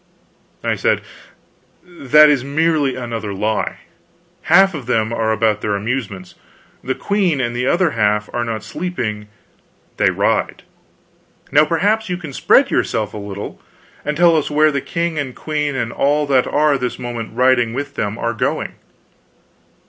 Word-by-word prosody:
I - - +1
said: - - +1 0.8
"That 150 -4 +5
is 145 -4 +2
merely 145 -1 +1
another 115 -5 -5
lie. 105 +2 -2 0.7
Half 195 -1 +6
of 140 -7 -7
them 110 -2 0
are 110 -1 0
about 110 -1 +1
their 105 -1 -1
amusements, 100 -4 -4 0.5
the 130 +1 -2
queen 195 -8 0
and 120 -2 -1
the 125 +1 -1
other 175 0 +2
half 105 -2 +1
are 120 - -1
not 110 -2 -4
sleeping, 110 - -4 0.7
they - - +3
ride. - - 0 0.9
Now 150 +2 +5
perhaps 205 +7 0
you 180 - -1
can 160 -6 -8
spread - - +3
yourself 105 -2 -1
a - - -6
little, 100 -1 -7 0.4
and 150 0 -2
tell 170 -1 +5
us 155 - 0
where 155 +1 +3
the 140 -1 -2
king 170 0 -2
and 130 -3 -4
queen 150 -2 -2
and 120 -3 -2
all 145 +2 +1
that 135 -3 +2
are 145 -2 +2
this 125 -1 -3
moment 120 -2 -6
riding 125 -2 +3
with 140 +1 -4
them 105 -2 -3
are 115 - -2
going?" 110 - -2
130 Hz, 155 wpm, -18 LUFS, 110-150 Hz, 0.9 s, Half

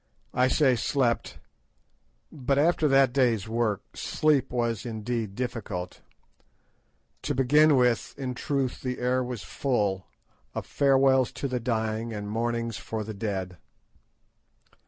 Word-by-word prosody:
I 125 +1 +3
say 130 -1 +3
slept; 120 0 0 0.9
but 135 -1 -1
after 160 +1 +3
that 135 -2 +4
day's 120 -6 +2
work, 110 -3 -1
sleep 145 -4 +1
was 120 -3 -1
indeed 110 -2 -3
difficult. 110 -7 -4 1.2
To - - -2
begin 150 +4 +5
with, 125 -2 +1
in 130 -2 -3
very - - -9
truth 135 -3 -1
the 125 -1 -3
air 125 +1 +1
was 125 -6 -5
full 100 - -1 0.5
"Of - - -3
farewells 135 -2 +3
to 140 - -3
the 125 -2 -2
dying 110 -1 -2
And 105 -1 -5
mournings 115 0 -1
for 110 -1 -4
the 110 +1 -6
dead." 95 -4 -4
120 Hz, 130 wpm, -27 LUFS, 110-130 Hz, 1.2 s, begin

